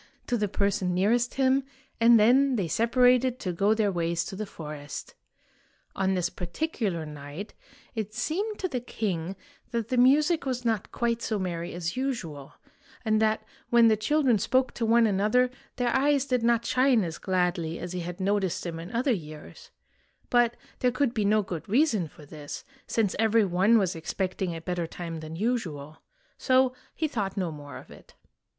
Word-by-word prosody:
" - - -39
to 245 - 0
the 210 -3 0
person 195 -2 0
nearest 230 +6 +2
him, 270 0 +3 0.4
and 230 0 +7
then 260 +5 +5
they 195 -7 0
separated 250 - +3
to 185 -8 -3
go 200 +5 +2
their 215 -2 +1
ways 170 -1 -1
to 190 - -6
the 210 +1 -4
forest. 150 -4 -8 0.8
On 190 0 +1
this 180 -2 +1
particular 180 - -3
night 150 +6 -8 0.4
it 215 -3 -3
seemed 405 - -2
to 375 - -2
the 265 -8 -2
king 195 -7 -3 0.3
that 230 -2 -3
the 255 - 0
music 295 +7 +4
was 250 -2 -3
not 225 -4 -1
quite 235 -1 -1
so 220 -2 -1
merry 175 -3 -3
as 175 +2 -3
usual, 185 - -4 0.5
and 215 0 +2
that 220 0 +2 0.3
when 235 -1 +6
the 220 - +4
children 245 +1 +2
spoke 260 +5 +2
to 230 - -2
one 230 +1 +5
another 215 +5 +2 0.2
their 245 -1 0
eyes 280 0 +3
did 250 -3 0
not 235 0 +2
shine 255 -3 +3
as 165 -2 -5
gladly 180 -3 0
as 175 - -6
he 180 - -3
had 175 +1 -6
noticed 195 -2 0
them 165 -2 -5
in 170 +4 -8
other 245 +2 +1
years; 155 -5 -9 0.6
but 240 -1 +3 0.2
there 250 - +2
could 255 -1 0
be 215 -4 0
no 210 +1 +3
good 170 -2 -6
reason 225 - +2
for 150 0 -15
this, 145 0 -8 0.2
since 220 -4 0
every 225 -1 +4
one 195 +5 +4
was 190 -5 +1
expecting 185 +1 -3
a 165 - -6
better 175 -1 -2
time 165 -1 -6
than 155 +1 -7
usual. 165 - -3 0.4
So 260 -1 +3 0.2
he 315 - 0
thought 205 -9 -3
no 180 -4 -1
more 145 -2 -9
of - - -13
it. - - -16
215 Hz, 180 wpm, -27 LUFS, 175-245 Hz, 0.8 s, and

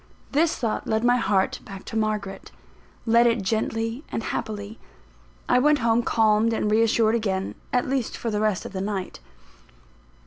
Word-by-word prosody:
This 315 +3 +2
thought 230 -4 -2
led 220 +1 0
my 245 +1 +4
heart 195 -5 +1
back 195 -1 -10
to - - -7
Margaret 210 -3 -2 0.6
led 235 +1 +5
it 230 -3 +1
gently 225 +4 -1
and 225 - -3
happily. 210 0 -5 0.7
I - - +4
went 300 +3 +4
home, 230 -2 +2
calmed 220 0 +2
and 210 -1 0
reassured 225 0 +3
again 195 -4 -1 0.2
at 250 - +1
least 260 -3 -2
for 230 - -3
the 210 0 -1
rest 215 -4 0
of - - -8
the 190 - -3
night. 195 -2 -4
220 Hz, 165 wpm, -24 LUFS, 210-235 Hz, 0.7 s, led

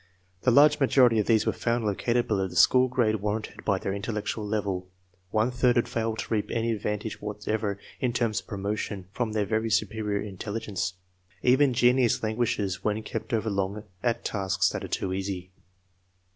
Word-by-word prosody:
The - - +3
large 145 +6 +6
majority 125 -4 +5
of 105 - 0
these 110 -2 +3
were - - +1
found 115 -1 -1
located 120 +4 0
below 95 -3 +1
the 90 - -10
school 125 +8 +6
grade 120 -4 +1
warranted 105 +2 -4
by 100 -2 +2
their 95 - -3
intellectual 105 +1 -3
level. 100 -3 -2 0.4
One 110 +4 +1
third 125 -1 +2
had 120 - +2
failed 115 -1 -2
to - - -3
reap 105 -2 0
any 115 0 0
advantage 105 0 -3
what 105 0 -6
ever, 105 -2 0 0.2
in 125 - +1
terms 115 -3 0
of - - -15
promotion, 100 -1 -4
from 110 0 -2
their 105 -1 +1
very 110 +2 0
superior 105 -1 0
intel 100 +1 -6
ligence. 95 -4 -3 0.5
Even 130 +2 +5
genius 125 0 +3
languishes 110 -4 -1
when 105 +1 -1
kept 110 +4 -5
over 110 -2 0
long 100 +1 -2 0.2
at 120 -2 -1
tasks 100 -2 +1
that - - -4
are - - -4
too 95 - -2
easy. 95 -1 -4
110 Hz, 185 wpm, -27 LUFS, 100-115 Hz, 0.5 s, large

